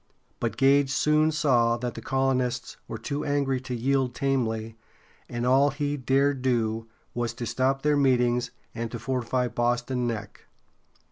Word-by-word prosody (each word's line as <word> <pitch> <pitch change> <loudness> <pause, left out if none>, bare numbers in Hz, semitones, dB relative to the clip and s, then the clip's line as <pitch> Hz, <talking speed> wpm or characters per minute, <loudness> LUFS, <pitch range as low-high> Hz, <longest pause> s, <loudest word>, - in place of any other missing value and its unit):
But 115 -2 -2
Gage 135 +1 +4
soon 150 +3 +3
saw 120 -6 +2
that 120 0 -4
the - - -8
colonists 130 -2 0
were - - -5
too 140 +6 -3
angry 140 -3 0
to 125 -1 -4
yield 130 +1 0
tamely, 115 -5 -1 0.5
and 120 0 -3
all 135 +3 +5
he 145 +1 -2
dared 135 0 +1
do 115 -3 0 0.3
was 120 -1 -2
to 120 -1 -4
stop 135 +3 0
their 150 0 +3
meetings 125 -3 +2 0.2
and 115 0 -4
to 120 - -5
fortify 125 +1 -1
Boston 120 +1 0
Neck. 110 -3 -6
125 Hz, 150 wpm, -26 LUFS, 120-135 Hz, 0.5 s, all